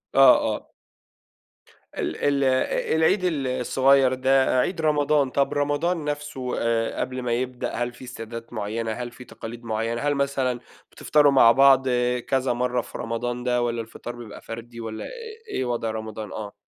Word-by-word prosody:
آه، 135 -2 +8 0.2
آه. - - -11 1.3
ال - - -2
ال 140 -1 +1
أ 130 +3 +1
العيد 160 +5 +3
ال 155 -7 0
الصغير 130 +1 +3
ده 130 0 +3
عيد 165 +6 0
رمضان، 150 -2 +2
طب 140 +2 +1
رمضان 145 +3 0
نفسُه 145 -4 -4
آآ، 115 -1 0
قبل 130 0 -3
ما 125 -1 -2
يبدأ 125 +1 -2
هل 120 0 -2
في 120 - -13
استعدادات 115 -1 -8
معيّنة، 110 +1 -3
هل 120 +2 -5
في 125 - -12
تقاليد 120 +1 -9
معيّنة؟ 115 +1 -2
هل 145 0 +1
مثلًا 135 -3 0 0.3
بتفطروا 145 -2 +3
مع 125 -4 +7
بعض 135 +1 +5 0.4
كذا 130 -2 +1
مرة 125 0 0
في - - -9
رمضان 120 +2 -3
ده، 125 -1 +1
والَّا 120 -1 -1
الفطار 120 +1 -8
بيبقى 115 -3 -10
فردي، 115 +1 -8
والَّا 110 -1 -5
إ - - -6 0.4
إيه 130 - -2
وضع 120 -2 -1
رمضان؟ 110 -2 -6
آه. 105 -2 -6
125 Hz, 165 wpm, -24 LUFS, 115-140 Hz, 1.3 s, آه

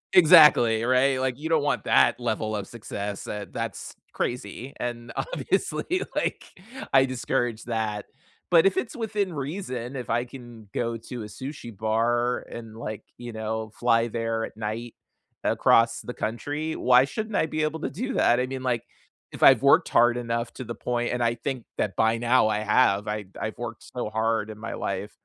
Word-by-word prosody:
Exactly, 150 -10 +7
right, 130 +2 +3
like, 130 0 -1
you 160 +2 -4
don't 155 -3 +3
want 145 - 0
that - - +4
level 110 -1 -1
of 100 -2 -4
success, 105 -3 -6
uh, 105 -1 -4
that's - - -5 0.2
crazy, 125 +1 -4
and, 120 -1 -4
obviously, 370 -6 -1
like, - - -1 0.5
I 135 0 +7
discourage 120 -3 -2
that, 110 -3 -2 0.5
but 170 +2 +7
if 195 - 0
it's 240 - -2
within 210 -5 -2
reason, 140 -4 -4
if 125 -3 -4
I 120 +2 +1
can 120 -4 -12
go 115 -1 -2
to 115 0 -7
a - - -6
sushi 120 +1 -8
bar 115 +3 +1
and, 115 -1 -9
like, 110 -2 -6
you 120 -1 -8
know, 110 0 -4
fly 115 -1 +2
there 115 0 -2
at - - -11
night 110 +2 -4 0.5
across 115 0 +4
the 125 - -6
country. 145 +9 -3
Why 125 0 +5
shouldn't 215 +6 -4
I - - +2
be 155 0 -1
able 155 +1 -2
to - - -2
do 255 +8 -4
that? 120 +1 +4
I 125 - +1
mean, 130 0 -5
like, 125 -3 0 0.5
if - - -4
I've - - +8
worked - - +5
hard 120 +1 +4
enough 115 -1 -2
to - - -7
the 120 -1 -6
point 120 +1 -2
and 125 - -2
I 115 0 +2
think 125 0 -4
that 100 - -1
by 110 +1 +3
now 120 0 +3
I 105 -1 0
have. 105 -2 +3
I 105 -1 -3 0.2
I've 110 - -3
worked 120 -2 -6
so 120 -3 -2
hard 110 0 0
in 110 - -8
my 115 - -5
life 100 +2 -3
120 Hz, 185 wpm, -26 LUFS, 110-130 Hz, 0.5 s, I've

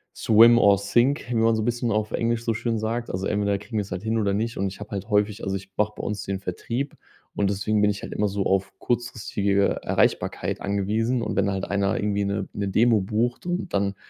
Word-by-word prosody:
swim 115 +2 +6
or 100 -3 +5
sink, 120 +8 +1
wie 120 - -1
man 115 0 +3
so 110 - -1
bisschen 120 +1 -1
auf 105 0 -1
Englisch 115 0 0
so 115 - +1
schön 115 +1 -1
sagt. 115 +2 -2
Also, 95 +1 -3
entweder 100 -1 0
kriegen 105 +3 -6
wir's 100 -2 -3
halt 90 +1 -4
hin 110 +1 0
oder 100 -2 +1
nicht. 115 +3 -2
Und 100 - 0
ich 95 0 -8
habe 105 - -9
halt 100 -3 -5
häufig 105 +1 +1
also, 95 0 -1
ich 95 0 -7
mache 105 0 +1
bei - - -6
uns 105 0 -3
den 95 -1 -3
Vertrieb 115 +9 -4 0.4
und 100 -1 +1
deswegen 100 +1 0
bin 105 - +4
ich 100 0 -3
halt - - -6
immer 105 - +1
so 100 0 -2
auf 95 0 0
kurzfristige 110 -5 0
Erreichbarkeit - - 0
angewiesen 110 +5 0
und - - -3
wenn 100 +1 +2
halt 95 -1 -2
einer 100 0 0
irgendwie 100 -1 0
'ne 100 -1 -2
'ne 100 -1 -2
Demo 110 +2 +3
bucht 115 - -1
und 175 +2 -3
dann, 100 0 0
105 Hz, 230 wpm, -24 LUFS, 100-115 Hz, 0.4 s, swim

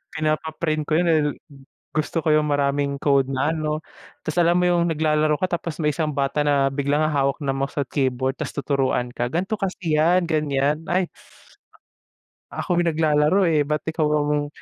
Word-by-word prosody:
Pinapa-print 155 0 -1
ko - - -9
yun 175 +1 +2
eh. 155 - +4 0.7
Gusto 155 +2 -1
ko 155 - +1
yung 150 0 +3
maraming 140 0 0
code 140 -2 +3
na 135 +3 0
ano, 155 -1 -2 0.4
tas 155 +2 -4
alam 170 0 +4
mo 180 - +3
yung 170 -1 +2
naglalaro 155 -1 +1
ka, 180 -2 0
tapos 165 -1 -6
may 150 - +2
isang 150 0 -1
bata 140 +1 0
na 140 -1 +3
biglang 140 +2 0
hahawak 140 -1 0
ng 135 -1 -1
mouse 135 +1 -2
at 135 - -5
keyboard, 130 -1 -1
tas - - -5
tuturuan 135 -3 0
ka, 120 0 -2
gan'to 190 +6 -1
kasi 185 -6 -2
yan 175 +3 +3
ganyan, 150 0 0
ay 180 0 0 1.4
Ako 175 -1 -1
yung 170 - +1
naglalaro 155 +3 +2
eh 160 -3 +3
ba't 150 +1 -1
ikaw 160 -1 0
ang 150 -1 0
150 Hz, 175 wpm, -23 LUFS, 140-160 Hz, 1.4 s, eh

